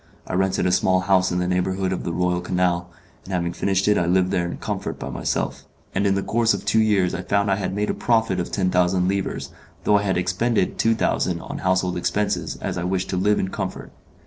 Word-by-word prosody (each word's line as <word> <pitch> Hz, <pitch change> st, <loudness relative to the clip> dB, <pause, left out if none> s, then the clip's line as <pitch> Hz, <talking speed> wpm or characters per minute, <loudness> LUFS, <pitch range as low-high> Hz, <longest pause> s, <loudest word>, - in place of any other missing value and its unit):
I -, -, -6 dB
rented 95 Hz, +1 st, +1 dB
a 90 Hz, -, +2 dB
small 95 Hz, 0 st, +3 dB
house 95 Hz, -1 st, +2 dB
in 90 Hz, -, 0 dB
the 90 Hz, 0 st, 0 dB
neighbourhood 95 Hz, +1 st, 0 dB
of 95 Hz, -, -4 dB
the 85 Hz, -, -2 dB
Royal 90 Hz, +1 st, 0 dB
Canal, 90 Hz, -1 st, 0 dB, 0.3 s
and 95 Hz, -, -10 dB
having 85 Hz, -1 st, -1 dB
furnished 95 Hz, 0 st, 0 dB
it 105 Hz, -, +4 dB
I 85 Hz, -, 0 dB
lived 90 Hz, +1 st, +2 dB
there 85 Hz, -1 st, 0 dB
in -, -, -5 dB
comfort -, -, -4 dB
by -, -, -6 dB
myself; -, -, -2 dB, 0.3 s
and 100 Hz, +2 st, +1 dB
in 95 Hz, -, +2 dB
the 100 Hz, -, -1 dB
course 115 Hz, 0 st, +2 dB
of -, -, -7 dB
two 110 Hz, -, +3 dB
years 100 Hz, -5 st, +2 dB
I 95 Hz, -, -3 dB
found 100 Hz, +2 st, +1 dB
I 100 Hz, -, +2 dB
had 95 Hz, -1 st, -3 dB
made 105 Hz, +1 st, 0 dB
a -, -, -2 dB
profit 110 Hz, -6 st, +1 dB
of 90 Hz, -, -3 dB
ten 95 Hz, -2 st, 0 dB
thousand 90 Hz, 0 st, +2 dB
livres, 100 Hz, 0 st, -2 dB, 0.3 s
though 105 Hz, -1 st, +4 dB
I -, -, -2 dB
had 95 Hz, -3 st, 0 dB
expended 95 Hz, +7 st, 0 dB
two 115 Hz, 0 st, +3 dB
thousand 90 Hz, -5 st, 0 dB
on -, -, -6 dB
household 95 Hz, -1 st, +1 dB
expenses 105 Hz, +4 st, -1 dB
as -, -, -4 dB
I -, -, -3 dB
wished 95 Hz, +1 st, -1 dB
to -, -, -1 dB
live 105 Hz, +3 st, +2 dB
in 95 Hz, -, -1 dB
comfort. 95 Hz, -1 st, -5 dB
95 Hz, 240 wpm, -23 LUFS, 90-100 Hz, 0.3 s, it